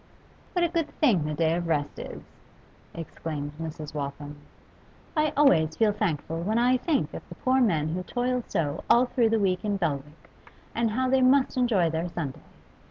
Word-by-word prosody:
'What 355 -1 +2
a - - 0
good 335 -2 -1
thing 210 - +3
the 155 0 -2
day 160 +1 +2
of 170 0 -2
rest 145 -3 -1
is!' - - -8 0.7
exclaimed 155 -3 -5
Mrs. 155 -2 -6
Waltham. 145 0 -5 0.8
'I 305 -1 +2
always 160 - +4
feel 220 -2 +3
thankful 165 -5 -2
when 215 +6 0
I 250 +2 +4
think 295 +3 0
of - - -6
the - - -9
poor 260 0 +2
men 160 -10 +2
who 175 +3 -2
toil 245 +5 -1
so 150 -1 -2
all 240 +2 +6
through 245 -2 +2
the 225 - +2
week 185 -3 +1
in 205 -2 0
Belwick, 150 -3 -4 0.5
and 230 0 +1
how 255 +4 0
they 265 0 +3
must 260 +1 +4
enjoy 220 -10 +2
their 165 +2 -2
Sunday. 150 -6 -5
185 Hz, 180 wpm, -27 LUFS, 155-250 Hz, 0.8 s, all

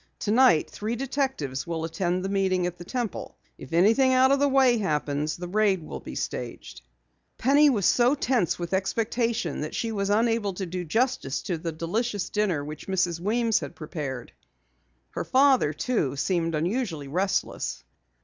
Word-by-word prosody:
Tonight 220 -6 +4
three 220 +3 -4
detectives 255 - -2
will 165 -1 -3
attend 180 +2 -1
the - - -2
meeting 190 -2 +1
at 175 0 -3
the - - -7
Temple. 240 +2 -4 0.2
If - - -11
anything 225 +10 +4
out 260 +1 +5
of 275 - +3
the 285 - +3
way 260 -3 +4
happens, 150 -4 -1
the 175 0 -6
raid 195 -2 +1
will - - -7
be - - -9
staged." - - -5 0.6
Penny 285 +4 +5
was 210 -9 +1
so 250 +3 +4
tense 245 - 0
with 175 +1 -5
expectation 220 - -1
that 150 - -4
she 230 - -2
was 200 -2 -2
unable 220 -2 +1
to 190 - -3
do 180 +1 -4
justice 225 - -1
to 175 -6 -3
the 165 +1 -3
delicious 205 +6 -2
dinner 190 -9 0
which 150 +1 -8
Mrs. 180 -3 0
Weems 225 +4 +1
had - - -7
prepared. 145 -6 -6 0.8
Her - - -3
father, 265 - +4
too, 155 - -1
seemed 165 +2 0
unusually 170 - -2
restless. 185 +7 -2
195 Hz, 165 wpm, -26 LUFS, 165-235 Hz, 0.8 s, out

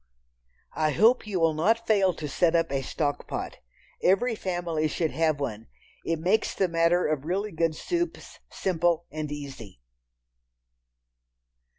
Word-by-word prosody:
I 155 -1 +1
hope 225 - +4
you 195 -4 -1
will 165 -1 +3
not 225 +9 +1
fail 200 -4 +3
to 155 - -5
set 170 +3 +2
up 165 -2 +1
a 135 -1 0
"stock 145 +2 -2
pot." - - -5 0.4
Every 200 +7 +3
family 175 -6 -1
should 160 +1 -1
have 155 -2 +1
one. 110 -6 -4 0.4
It 165 - -1
makes 185 +7 +1
the 190 - +2
matter 170 +1 +2
of 150 -3 -1
really 195 +6 -2
good 165 -1 0
soups 345 - -3
simple 175 -2 0
and 155 -1 -4
easy. 135 - -8
165 Hz, 145 wpm, -27 LUFS, 155-190 Hz, 0.4 s, hope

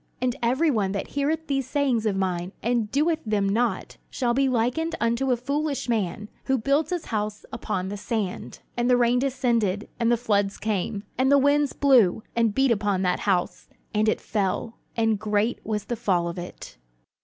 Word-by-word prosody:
"And 250 -1 0
every 265 +7 +2
one 200 -6 0
that 200 - -3
heareth 300 +3 -1
these 270 -3 -1
sayings 260 -6 +1
of 200 - 0
mine, 185 -1 -2
and 235 -2 +1
doeth 315 +3 +1
them 210 -3 0
not, 220 -1 -1
shall 240 -2 0
be 270 +1 +2
likened 255 +8 0
unto 235 +3 +1
a 250 - +3
foolish 280 +3 -2
man, 210 -3 -1 0.2
which 265 -4 +1
built 285 +4 +2
his 355 -3 -3
house 210 0 -2
upon 190 -3 -3
the 205 - -4
sand: 205 -2 -4
"And 240 +1 0
the 250 - +5
rain 245 0 +3
descended, 235 -7 0
and 235 0 +2
the 240 - +3
floods 205 -4 0
came, 205 -1 -2 0.2
and 265 +1 +3
the 280 - +7
winds 285 0 +3
blew, 240 -8 +4
and 230 -3 +2
beat 270 -1 +3
upon 205 -3 +1
that 180 -1 +1
house; 180 -2 -1 0.2
and 215 0 +2
it - - 0
fell: 210 +2 -2 0.2
and 225 -2 +2
great 210 +2 0
was 210 -1 -3
the 240 - -2
fall 185 -7 0
of 170 +1 -5
it." 175 - -9
230 Hz, 190 wpm, -25 LUFS, 205-265 Hz, 0.2 s, the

